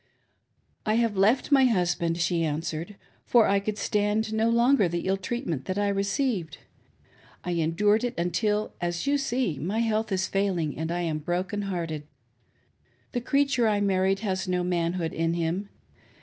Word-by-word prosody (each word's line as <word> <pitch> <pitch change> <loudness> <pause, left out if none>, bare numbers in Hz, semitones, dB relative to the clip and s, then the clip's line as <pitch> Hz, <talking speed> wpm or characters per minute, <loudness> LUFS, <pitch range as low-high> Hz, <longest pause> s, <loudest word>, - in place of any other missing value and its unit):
" - - -47 0.3
I 215 - +3
have 230 -2 +1
left 215 +9 +2
my 270 -2 +6
husband," 175 -6 +1
she 170 0 +1
answered, 160 +4 -3 0.2
" - - -36
for 235 -3 +5
I 200 0 +3
could 205 +1 -3
stan4 210 +1 0
no 220 +1 +2
longer 235 -2 +4
the 170 0 -2
ill 190 +1 +2
treatment 190 - -4
that 185 - -3
I 205 0 +1
received. 200 - -1 0.9
I 180 - -3
endured 175 +7 +2
it 245 - -2
until, 210 +5 0
as 175 +3 -2
you 285 0 +2
see, 245 - -1
my 190 +9 -2
health 220 -1 0
is 190 0 +1
failing 185 -6 -1
and 160 +2 -3
I 175 +1 -1
am 160 -3 -1
broken 180 +6 -2
hearted. 160 -5 -4 1.0
The 245 - -2
creature 275 -2 +2
I 210 -1 +2
married 195 0 +1
has 190 -3 -2
no 180 -1 0
manhood 170 -1 -1
in 165 +1 0
him. 175 +4 -2
195 Hz, 170 wpm, -26 LUFS, 170-220 Hz, 1.0 s, my